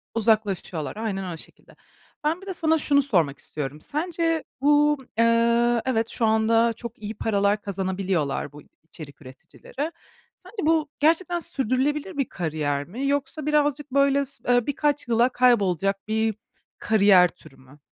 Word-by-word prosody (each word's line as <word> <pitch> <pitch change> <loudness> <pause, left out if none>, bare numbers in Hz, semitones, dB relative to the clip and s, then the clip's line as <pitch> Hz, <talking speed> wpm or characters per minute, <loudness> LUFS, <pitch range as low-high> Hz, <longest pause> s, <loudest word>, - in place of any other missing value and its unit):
uzaklaşıyorlar, 205 -8 0
aynen, 195 -5 -3
o - - -8
şekilde. - - -15 0.5
Ben 320 +4 0
bir 390 - -13
de 380 - -3
sana 320 -2 +1
şunu 285 -2 +3
sormak 170 - 0
istiyorum: 150 0 -6
Sence 330 - -1 0.2
bu, 295 +1 +4 0.2
eee, 235 +1 +3
evet, 225 -3 0
şu 230 - -1
anda 225 +1 +3
çok 235 0 -9
iyi 215 +1 -6
paralar 205 -1 +1
kazanabiliyorlar 190 -7 -2
bu 150 0 -12 0.2
içerik 155 -3 -12
üreticileri; 245 - -8 0.5
sence 370 +4 -17
bu 315 -2 +2
gerçekten 335 +3 +2
sürdürülebilir 290 - -1
bir 275 - -1
kariyer 150 -4 -2
mi? 255 +9 -4
Yoksa 285 +1 -2
birazcık 295 -1 0
böyle, 280 +1 +3
s 275 +1 -13
eee, 245 -2 +2
birkaç 290 -1 -1
yıla 235 +2 +3
kaybolacak 195 -6 +1
bir 220 -1 0 0.4
kariyer 200 -4 +5
türü 155 -6 -18
mü? 130 +3 -19
230 Hz, 145 wpm, -24 LUFS, 195-290 Hz, 0.5 s, kariyer